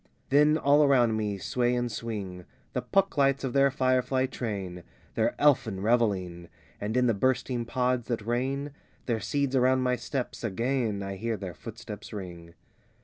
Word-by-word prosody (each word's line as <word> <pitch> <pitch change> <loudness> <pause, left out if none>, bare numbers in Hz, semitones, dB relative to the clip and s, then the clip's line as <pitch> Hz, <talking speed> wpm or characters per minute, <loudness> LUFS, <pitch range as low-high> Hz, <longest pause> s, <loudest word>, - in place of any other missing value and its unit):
XI - - -38
Then 150 +1 +5
all 145 0 +4
around 125 -5 +4
me 105 -2 -1
sway 120 +5 0
and 120 -1 -1
swing 100 -6 -5 0.3
The - - -1
Puck 195 -4 +1
lights 140 0 +3
of 130 -2 -2
their 140 0 +5
firefly 130 0 +1
train, 100 -8 -5 0.3
Their - - 0
elfin 120 -9 +3
revelling; 95 -6 0 0.3
And 105 +4 -2
in 125 - +4
the 115 - +3
bursting 125 +2 0
pods, 125 0 0
that 115 -4 -2
rain 135 +5 -1 0.3
Their 115 -3 0
seeds 140 +2 -1
around 130 0 +3
my 125 0 +2
steps, 125 +1 -4
again 115 -1 -1
I 95 0 -5
hear 115 +1 -2
their 95 -3 -6
footsteps 110 -1 -9
ring. 85 -4 -8
120 Hz, 165 wpm, -28 LUFS, 105-130 Hz, 0.3 s, Then